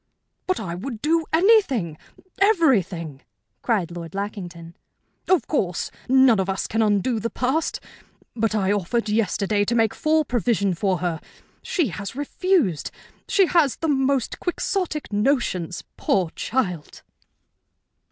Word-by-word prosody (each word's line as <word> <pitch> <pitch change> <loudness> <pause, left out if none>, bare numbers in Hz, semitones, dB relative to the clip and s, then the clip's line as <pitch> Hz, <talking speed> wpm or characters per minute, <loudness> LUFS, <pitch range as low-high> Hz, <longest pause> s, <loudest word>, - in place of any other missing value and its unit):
"But 370 - 0
I 175 -6 -4
would 220 +6 -6
do 325 +1 +2
anything 320 - +3 0.4
everything!" 210 - +2 0.4
cried 195 -8 0
Lord 170 0 -8
Lackington. 180 -5 -6 0.5
"Of 370 -3 +3
course, 180 - -1 0.2
none 260 -4 +5
of 190 0 -1
us 190 - -1
can 225 - -1
undo 215 +2 +1
the 230 +2 -2
past. 265 +8 -1 0.6
But 225 -1 0
I 195 -2 +1
offered 210 +3 -1
yesterday 205 -1 +1
to 235 +3 0
make 225 -2 +2
full 310 -1 +1
provision 230 -6 +1
for 185 +1 0
her. 165 -3 -2 0.4
She 335 - 0
has 200 +4 -6
refused. 290 - 0 0.4
She 390 - +4
has 330 -7 +3
the 325 - -2
most 270 -2 +1
Quixotic 355 - -2
notions, 205 - 0
poor 180 -4 +1
child!" 180 - -3
225 Hz, 130 wpm, -23 LUFS, 190-290 Hz, 0.6 s, none